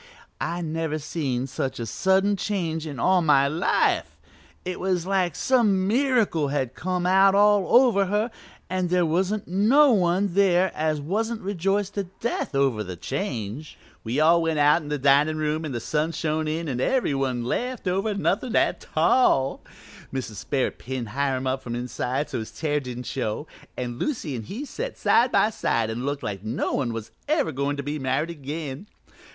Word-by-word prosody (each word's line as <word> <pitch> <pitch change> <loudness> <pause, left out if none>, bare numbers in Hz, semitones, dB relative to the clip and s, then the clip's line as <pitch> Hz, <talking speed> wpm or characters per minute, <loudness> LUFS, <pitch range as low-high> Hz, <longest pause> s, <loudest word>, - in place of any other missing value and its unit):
I 170 +1 -2
never 160 -1 -2
seen 145 -5 -2
such 130 -1 -4
a 115 - -3
sudden 190 - +2
change 170 -6 -2
in 140 -5 -6
all 185 +7 +3
my 140 -4 +4
life; 160 +6 +1 0.5
it 180 0 -4
was 180 -2 0
like 185 -4 0
some 210 -7 +2
miracle 230 - +2
had 135 -3 -2
come 180 0 -2
out 195 +1 +5
all 205 -2 +4
over 220 -7 +3
her 210 +4 0 0.4
and 185 -1 -1
there 180 -1 +3
wasn't 190 +6 0
no 235 - +5
one 185 -2 +2
there 185 -1 +3
as 155 -1 -1
wasn't 220 +9 -2
rejoiced 195 +1 -1
to 200 -1 -2
death 235 -10 -2
over 135 -6 +1
the 90 -2 -7
change. 125 - -5 0.3
"We 120 +5 -1
all 165 +2 +5
went 165 -1 0
out 150 +3 +4
in 150 - -9
the 150 - -1
dinin' 145 +3 +3
room 155 +1 -1
and 140 -5 -4
the - - -1
sun 155 +7 -1
shone 155 -1 -1
in 160 +2 -2
and 125 -3 -2
every 255 - +1
one 130 -3 -1
laughed 245 - -3
over 195 +4 0
nothin' 215 +5 0
a - - +3
tall. 135 - +2 0.5
Mrs. 125 -6 -5
Sperrit 135 -3 -1
pinned 125 -3 -5
Hiram 135 +1 -1
up 130 +1 -1
from 120 -1 -5
inside 125 +3 -2
so - - -4
his 110 - -6
tear 150 +6 -1
didn't 125 -2 -6
show, 125 +2 -3 0.3
and 120 -1 -4
Lucy 195 - -2
and 115 -3 -6
he 245 - -6
set - - -5
side 245 +2 +3
by 215 - +3
side 115 - 0
and 120 +4 -4
looked 145 -1 -3
like 100 -3 -4
no 110 +4 -2
one 130 -4 0
was 115 -1 -6 0.2
ever 300 - +1
goin' 140 +1 -2
to - - -2
ever - - -16
be 150 +1 -3
married 135 +5 -1
again. 150 +2 -6
160 Hz, 185 wpm, -25 LUFS, 135-195 Hz, 0.5 s, out